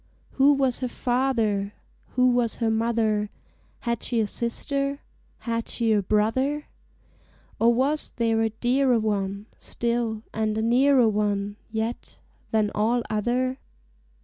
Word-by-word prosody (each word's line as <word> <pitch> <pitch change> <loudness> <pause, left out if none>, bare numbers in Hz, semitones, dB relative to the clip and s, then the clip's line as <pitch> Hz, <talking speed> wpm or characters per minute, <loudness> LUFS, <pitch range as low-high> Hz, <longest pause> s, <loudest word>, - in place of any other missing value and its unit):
Who 275 +2 +5
was 265 -3 +1
her 255 - -1
father? 235 -6 0 0.4
Who 250 0 +4
was 240 -2 +1
her 225 -2 0
mother? 220 -2 +1 0.5
Had 235 -1 -2
she 235 - -1
a 220 - +2
sister? 275 +6 -2 0.4
Had 230 -1 -3
she 230 -2 +1
a 210 - +3
brother? 245 +9 +1 0.9
Or 230 +1 +5
was 275 +6 +1
there 225 -1 +1
a 225 - +2
dearer 245 +2 +2
one 200 -2 -2
Still, 235 -2 -2
and 215 0 -1
a - - 0
nearer 250 +1 +4
one 205 -1 -1
Yet, 225 +2 -4 0.3
than 215 -2 +1
all 230 +3 +1
other? 250 +5 0
230 Hz, 130 wpm, -25 LUFS, 215-255 Hz, 0.9 s, Who